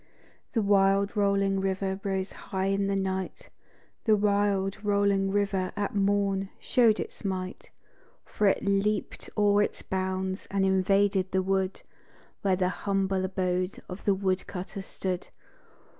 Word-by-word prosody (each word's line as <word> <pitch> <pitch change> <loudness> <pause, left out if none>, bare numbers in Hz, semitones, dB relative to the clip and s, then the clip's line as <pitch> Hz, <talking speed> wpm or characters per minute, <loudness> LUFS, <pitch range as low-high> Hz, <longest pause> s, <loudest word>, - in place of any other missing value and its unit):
The 225 - +1
wide 200 +1 +3
rolling 200 -1 +2
river 190 0 -1
rose 190 -1 -2
high 190 0 -4
in 195 0 0
the 200 - 0
night, 190 -1 -3 0.6
The 220 -2 +5
wide 200 -1 +1
rolling 200 -1 +2
river, 195 -2 0
at 205 -1 -2
morn, 195 -1 +1
show'd 230 -4 +3
its - - -6
might, 185 -2 -4 0.6
For 210 - 0
it 195 - +2
leaped 200 +1 0
o'er 205 0 +4
its - - -2
bounds, 190 0 -2
and 195 0 +1
invaded 190 0 +2
the 190 0 +1
wood 190 0 -1 0.6
Where 195 -2 +2
the 180 0 +1
humble 195 0 0
abode 185 0 -1
of 180 +2 -8
the 200 - +4
wood 190 -1 -1
cutter 190 +1 -6
stood. 185 -1 -4
195 Hz, 140 wpm, -28 LUFS, 190-200 Hz, 0.6 s, The